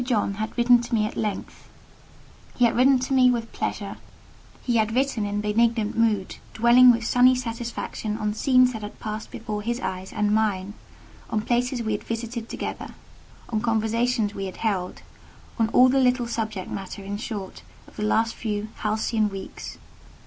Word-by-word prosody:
John 225 -5 0
had 215 +4 -5
written 240 0 +5
to 240 0 -2
me 215 -1 +2
at 215 - -5
length; 210 -3 -4 0.9
he 245 - +4
had 230 - +2
written 260 +2 +5
to 255 +2 -2
me 255 -1 +6
with 230 -2 -2
pleasure; - - -4 0.7
he 240 -2 +1
had 220 +1 +1
written 255 -5 +1
with 205 +1 -2
benignant 225 0 +1
mood, 215 -4 +1 0.2
dwelling 240 +2 +7
with 230 -2 +3
sunny 250 +2 +5
satisfaction 230 -3 -4
on 210 -1 -1
scenes 255 +2 +4
that 220 - -6
had 210 - -8
passed 215 0 -5
before 215 -2 -5
his 235 +3 -2
eyes 185 -5 -5
and 210 0 0
mine,—on 210 +1 -3
places 245 +2 0
we 220 - -2
had 210 - -2
visited 230 0 -5
together—on 220 -2 -7
conversations 225 0 0
we 195 - -4
had 185 - -8
held—on 215 +2 -4
all 250 +3 +6
the 265 +1 +3
little 250 -1 +2
subject 220 -5 -4
matter, 195 0 -6
in 200 +1 -4
short, 205 -4 -6 0.3
of - - -18
the - - -6
last 225 +1 +2
few 210 -1 -3
halcyon 215 0 0
weeks. 195 -1 -8
225 Hz, 165 wpm, -24 LUFS, 210-240 Hz, 0.9 s, dwelling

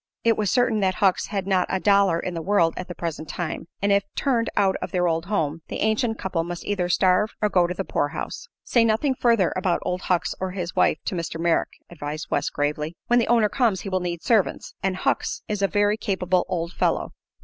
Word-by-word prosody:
It 230 -1 +4
was 210 -2 0
certain 245 -3 +2
that 190 -2 +1
Hucks 190 -2 +2
had 195 -3 -3
not 190 -2 +2
a 190 - 0
dollar 200 -4 +3
in 180 - -4
the 165 - -4
world 170 -3 +2
at 180 - -6
the 175 - -7
present 160 -2 -5
time, 170 -1 -4 0.2
and 200 - +3
if 200 0 +4
turned 240 -5 +1
out 195 -2 +3
of - - -3
their 180 -1 +1
old 165 0 -1
home 165 -6 -1
the - - -5
ancient 220 +1 +1
couple 180 -3 -2
must 175 +1 -6
either 185 -4 -1
starve 185 +4 +2
or 210 - +1
go 180 -3 +3
to 180 - -3
the 195 - -3
poorhouse. 165 - -3 0.2
"Say 235 - +3
nothing 230 +5 +2
further 230 -7 +2
about 185 -2 +1
Old 180 +1 -2
Hucks 180 -3 0
or 185 -1 -3
his 180 -2 -4
wife - - +3
to - - -2
Mr. 165 -2 -4
Merrick," 170 0 +1
advised 155 -2 -6
West, 145 - 0
gravely. 150 +2 -2
"When 240 0 +3
the 235 - +1
owner 230 -2 +4
comes 220 -5 +1
he 195 - -5
will 185 -1 0
need 175 -2 -4
servants, 220 -5 +1
and 190 0 0
Hucks 185 - -1
is 210 -1 -2
a 195 - +4
very 205 +1 +2
capable 185 -4 0
old 170 -1 -2
fellow. - - 0
185 Hz, 225 wpm, -24 LUFS, 170-210 Hz, 0.2 s, It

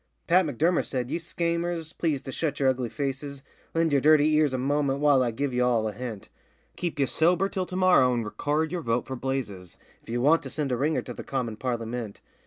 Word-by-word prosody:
Pat 180 0 +4
M'Durmer 160 +6 +1
said, 125 -2 -3
'Ye - - -1
schaymers, 170 -1 -2
please 155 -5 -1
to 135 - -6
shut 145 0 -2
yer 135 -2 +4
ugly 125 -2 -1
faces, 140 +1 -4 0.3
Lend 165 -2 +2
yer 140 - +5
dirty 155 +1 +5
ears 150 -2 +3
a 130 - -1
momint 140 +1 0
while 145 -2 +4
I 125 - +1
give 130 +3 -2
ye 125 - 0
all 120 -3 +2
a - - -2
hint: 115 -2 -7 0.5
Keep 170 -4 -3
ye 140 - +3
sober 175 +7 +2
till 185 -2 -3
to 185 - -7
morrow 185 -9 +5
and 120 -2 -1
record 150 +8 -1
yer 180 -1 -2
vote 115 -3 -1
for 130 - -5
Blazes 120 -9 -4 0.2
If - - -18
ye 120 - -1
want 150 +7 +4
to - - -7
send 145 -4 -2
a - - +2
ringer 150 +6 0
to 125 - -7
the - - -8
commin 125 -5 -3
Parlymint. 115 -3 -4
140 Hz, 225 wpm, -26 LUFS, 125-160 Hz, 0.5 s, yer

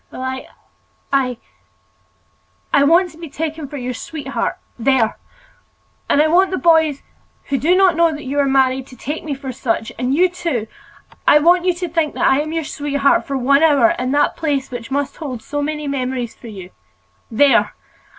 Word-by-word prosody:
"Well, 255 - -8
I—I—I 260 +1 -6
want 340 +4 +4
to 320 - -17
be 330 -2 -8
taken 315 0 -4
for 290 +1 -7
your 250 -1 -4
sweetheart—there! 265 -4 -2 0.9
and - - +3
I 300 - +5
want 365 +4 +4
the 375 - -2
boys, 320 -1 +3 0.5
who 275 -2 0
do 335 +8 +3
not 375 -2 +4
know 335 0 +3
that 300 -1 -7
you 280 +2 -2
are 280 - +3
married, 265 -1 +2
to 255 - -13
take 295 +5 -5
me 295 -3 -3
for 270 -1 -6
such; 225 -2 -2
and 250 +2 0
you 360 +4 +4
too—I 310 -5 -2
want 350 +4 +4
you 365 - +3
to 355 0 -4
think 325 -2 -1
that - - 0
I 265 - +4
am 305 +1 -3
your 325 0 -2
sweetheart 285 -2 0
for 275 - -2
one 275 +3 +3
hour, 285 -7 +5
in 255 +1 -2
that 290 0 +2
place 285 -5 -2
which 235 -2 -7
must 280 0 -2
hold 255 -7 -6
so 290 0 -3
many 300 0 -3
memories 255 -3 -3
for 240 - -13
you. 190 -4 -10 0.6
There! 275 +5 +3
285 Hz, 180 wpm, -19 LUFS, 260-315 Hz, 0.9 s, I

